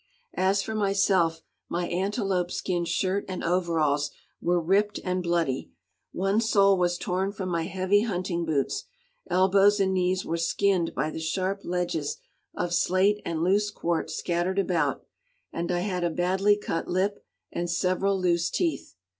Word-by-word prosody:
As 195 +1 +2
for 220 - -4
myself, 195 -5 +2 0.3
my 175 0 -1
antelope 190 -1 -1
skin 175 -1 -2
shirt 185 +4 0
and 185 -1 -5
overalls 160 -5 +1 0.3
were 175 +1 +2
ripped 195 +5 +1
and 185 0 -1
bloody, 170 -6 -1 0.4
one 195 +4 +1
sole 200 -3 +4
was 175 -1 +1
torn 185 +3 -1
from 195 -2 -5
my 165 -2 -1
heavy 190 +2 +2
hunting 180 -5 -2
boots, 160 - -1 0.4
elbows 195 +2 +4
and 190 -1 +2
knees 185 0 +1
were 165 - -1
skinned 170 +1 +1
by 150 +4 -1
the - - -5
sharp 185 +5 -2
ledges 170 -4 -2 0.4
of 175 0 -2
slate 195 +4 +2
and 165 -1 -2
loose 205 +3 +2
quartz 170 -4 -2
scattered 175 +2 -1
about, 180 -4 0 0.5
and 170 +1 -2
I 175 0 0
had 180 -2 -2
a 175 - +2
badly 190 +5 +2
cut 165 -5 -3
lip 195 +3 -1 0.3
and 175 0 -3
several 185 +3 +1
loose 175 -2 +1
teeth. 335 -3 -2
185 Hz, 155 wpm, -27 LUFS, 170-195 Hz, 0.5 s, sole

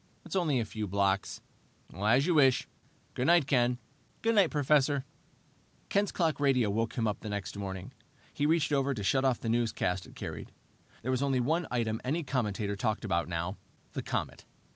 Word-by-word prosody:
It's - - -6
only 160 -8 +2
a 115 - -1
few 110 0 -4
blocks." 100 0 0 0.5
"As 110 +8 +3
you 180 - +2
wish. 135 -5 +4 0.5
Good 125 - -1
night, 170 -3 +5
Ken." 125 -3 +2 0.5
"Good 230 0 +3
night, 200 -6 +5
Professor." 145 -1 +2 0.8
Ken's 200 0 +1
clock 165 -5 0
radio 130 -7 +3
woke 115 +2 -1
him 115 - +1 0.2
the 110 - -6
next 100 -4 -4
morning. 95 -2 -5 0.4
He 145 - +1
reached 160 -2 +2
over 140 -1 +1
to 105 - -4
shut 130 +6 +2
off 130 -3 +2
the - - -4
newscast 110 -6 0
it - - -15
carried. - - -6 0.5
There 130 - -1
was 130 0 0
only 135 -2 +1
one 160 +7 +1
item 115 -2 -1
any 155 +6 -1
commentator 105 -7 -1
talked 110 +1 -1
about 85 -4 0
now, 85 +3 -3 0.4
the - - -3
comet. - - -3
125 Hz, 180 wpm, -30 LUFS, 105-145 Hz, 0.8 s, night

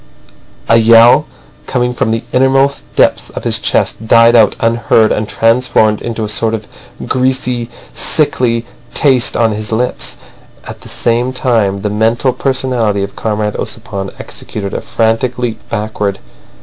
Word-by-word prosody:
A 115 - +5
yell 115 +6 +6 0.4
coming 125 -1 -1
from 120 - -1
the 115 0 -1
innermost 135 +2 +2
depths - - +2
of - - -8
his - - 0
chest 110 - -1
died 115 +1 +5
out 110 -3 +4
unheard 115 -1 +2
and 105 0 -2
transformed 115 -2 +2
into 115 -1 -4
a - - -2
sort 110 +1 0
of 110 -1 -7 0.4
greasy, 125 -2 -1 0.2
sickly 120 -6 +1 0.3
taste 130 -5 +2
on 115 -2 +2
his 105 +1 -5
lips. 120 +3 -2 0.5
At - - -10
the - - -11
same 120 +2 0
time 110 -6 0
the 105 - -1
mental 115 +4 +1
personality 125 -6 -1
of 100 - -6
Comrade 105 -1 -2
Ossipon 95 -1 -4
executed 100 -2 -7
a - - -3
frantic 115 +2 -1
leap 120 -2 -3
backward. 105 -2 -2
115 Hz, 145 wpm, -13 LUFS, 110-125 Hz, 0.5 s, yell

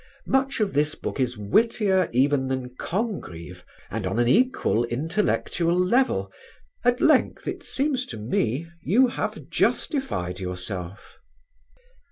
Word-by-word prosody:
Much 265 0 +1
of 210 -3 0
this 150 +1 +1
book - - -5
is 125 -2 0
wittier 190 - +2
even 130 +2 +2
than 130 -1 -3
Congreve 90 - -4 0.3
and 105 -3 -2
on 95 - -2
an 120 0 +3
equal 230 - +3
intellectual 165 - 0
level: 235 +9 +2 0.5
at 245 +1 +2
length, 305 -4 +3
it - - -3
seems 270 -2 -1
to 115 - -7
me, 120 +6 -1 0.2
you 245 +9 +4
have - - -4
justified 95 - 0
yourself." 90 0 -6
150 Hz, 125 wpm, -25 LUFS, -, 0.5 s, you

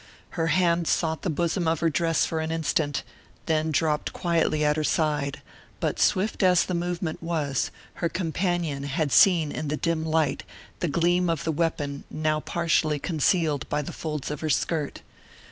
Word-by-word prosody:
Her 165 -2 -1
hand 170 0 +2
sought 160 -2 0
the 185 - -2
bosom 170 +2 0
of 160 -1 +1
her 165 - +3
dress 165 +1 +2
for 160 - -2
an 160 0 -2
instant, 150 -3 0 0.4
then 160 -1 +1
dropped 155 -1 0
quietly 165 -3 +1
at 150 0 +3
her 155 - -1
side, 150 -3 0 0.4
but - - -1
swift 200 +4 +2
as 180 -2 +4
the 185 - -3
movement 175 -1 -2
was, 155 -5 -1 0.3
her 170 - +1
companion 170 -3 -1
had 145 +1 -1
seen 165 -5 +5
in 155 - -4
the 150 +1 -1
dim 165 -1 0
light 160 -3 +1 0.4
the 175 - 0
gleam 175 +3 +2
of 165 -3 -1
the 160 - 0
weapon 150 -3 -2
now 155 0 0
partially 155 -2 +1
concealed 155 -1 0
by 150 0 0
the - - -7
folds 150 -3 -4
of 150 - -4
her 155 - -2
skirt. 155 -1 -1
160 Hz, 175 wpm, -26 LUFS, 150-170 Hz, 0.4 s, seen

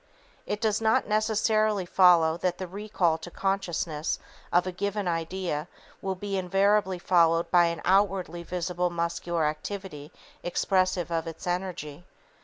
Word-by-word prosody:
It 205 - -2
does 215 -1 0
not 220 0 +3
necessarily 215 -1 +1
follow 175 -3 +5
that 180 0 -1
the 185 - -4
recall 185 -3 -1
to - - -8
consciousness 175 -5 -2 0.3
of 175 +1 +3
a 185 - -2
given 200 +2 -2
idea 165 -1 -2 0.3
will 190 -1 -2
be 195 +1 -3
invariably 195 +1 +2
followed 170 -2 +3
by 175 -1 +6
an 170 0 -2
outwardly 190 -3 +2
visible 180 0 -2
muscular 170 -1 -1
activity 155 -1 -5 0.3
expressive 185 -1 0
of 165 0 -1
its 165 - -8
energy. 175 -4 -4
180 Hz, 135 wpm, -27 LUFS, 170-195 Hz, 0.3 s, by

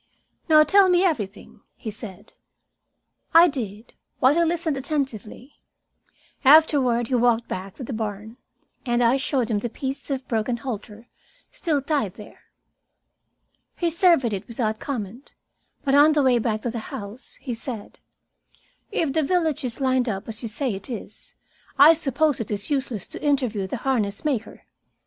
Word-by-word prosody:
"Now 305 -1 +7
tell 390 +3 +5
me 360 0 +4
about 370 - +5
everything," 205 -9 -8 0.2
he 220 - -6
said. 205 -1 -9 1.0
I 335 +1 +9
did, 225 - -6 0.2
while 260 +2 +4
he 340 +2 +3
listened 330 -2 0
attentively. 270 -3 -4 0.8
Afterward 270 -5 +5
we 255 - +2
walked 235 -1 +2
back 190 +1 -6
to - - -8
the 250 - -5
barn, 215 +1 -5 0.5
and 240 -2 +1
I 240 +3 +4
showed 260 -4 -1
him 210 - +1
the 240 - -4
piece 270 +4 -5
of 265 -2 -3
broken 230 +1 -1
halter 230 -2 -7 0.4
still 300 -5 -1
tied 280 - -1
there. 210 - -14 1.3
He 345 -2 0
surveyed 330 - +4
it 190 - -5
without 220 -2 -2
comment, 235 -1 -6 0.5
but 270 - 0
on 295 +2 +6
the 295 -2 +2
way 250 -2 +4
back 215 -1 -2
to 240 - -2
the 230 - -4
house 210 +5 -8
he 255 - -5
said: 230 -2 -6 0.9
"If 300 -5 -1
the 320 - +2
village 315 -1 0
is 250 0 -4
lined 260 -2 +1
up 195 -2 -4
as 225 0 -5
you 235 - -4
say 245 +2 -2
it 195 +4 -7
is, 220 -3 -9 0.4
I 290 +4 +9
suppose 300 -2 0
it 225 - -4
is 205 +5 -4
useless 260 -8 -2
to - - -8
interview 250 -9 0
the - - -4
harness 220 -4 -1
maker. 255 -7 -3
250 Hz, 165 wpm, -24 LUFS, 220-290 Hz, 1.3 s, I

